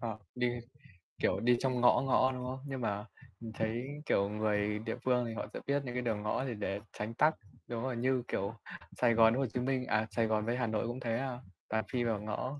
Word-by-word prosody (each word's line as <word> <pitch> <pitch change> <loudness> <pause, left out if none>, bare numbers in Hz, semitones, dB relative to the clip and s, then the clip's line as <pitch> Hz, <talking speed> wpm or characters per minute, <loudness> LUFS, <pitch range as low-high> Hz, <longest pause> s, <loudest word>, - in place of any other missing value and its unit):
Ờ, 110 -2 -3 0.2
đi, 125 0 +1 0.8
kiểu, - - +2
đi 120 +1 +4
trong 130 -2 0
ngõ 125 - +6
ngõ, 130 -1 +4
đúng 125 -1 -4
không? 130 +1 -4
Nhưng 135 -2 -4
mà 105 -1 -1 0.3
mình 115 -1 -7
thấy, 115 +4 -1 0.2
kiểu, 100 0 +2
người 105 0 0
địa 115 +1 -3
phương 125 -1 +3
thì 115 - -4
họ - - -4
sẽ - - -4
biết 140 0 +2
những 125 - -4
cái 125 - 0
đường 110 -4 -1
ngõ 115 +5 0
thì 125 - -2
để 100 -1 -2
tránh 110 +2 -4
tắc, 155 +6 +4 0.3
đúng 120 0 -3
rồi, 130 -2 -2
như 125 0 +2
kiểu, 100 +3 -1 0.4
Sài 120 -2 +4
Gòn 115 0 +6
với 130 - 0
Hồ 135 - +2
Chí 125 - 0
Minh, 130 0 0
à, 110 +1 +1
Sài 115 +1 +2
Gòn 110 -1 +1
với 120 +1 0
Hà 125 -2 +1
Nội 110 +1 0
cũng 120 +2 -4
thế, 115 -2 -1
à, 130 -1 -3 0.3
toàn 110 0 +1
phi 125 -1 +1
vào 110 -3 0
ngõ, 130 +7 -3
120 Hz, 250 wpm, -33 LUFS, 110-125 Hz, 0.8 s, ngõ